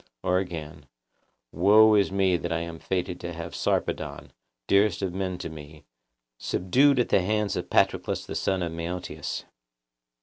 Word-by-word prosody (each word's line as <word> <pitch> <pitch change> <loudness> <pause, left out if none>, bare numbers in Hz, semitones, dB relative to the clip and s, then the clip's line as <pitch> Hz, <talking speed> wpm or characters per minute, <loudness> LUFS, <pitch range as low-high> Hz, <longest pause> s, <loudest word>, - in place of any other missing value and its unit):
Or 90 0 +2
again:— 80 -5 -7 0.6
Woe 105 +5 +6
is 100 -2 +3
me 95 -2 +2
that 85 0 -3
I 80 0 0
am 85 -1 -7
fated 90 -1 -3
to 85 0 -6
have 85 0 -7
Sarpedon, 70 -2 -2 0.3
dearest 100 - +2
of 95 -2 -2
men 95 -1 -3
to - - -5
me, 75 -1 -11 0.5
subdued 135 +10 +2
at 125 - +1
the - - +4
hands 105 +2 0
of - - -4
Patroclus - - +1
the - - -7
son 95 -2 0
of 85 - -3
Menoetius. 85 +2 -5
90 Hz, 160 wpm, -26 LUFS, 85-100 Hz, 0.6 s, Woe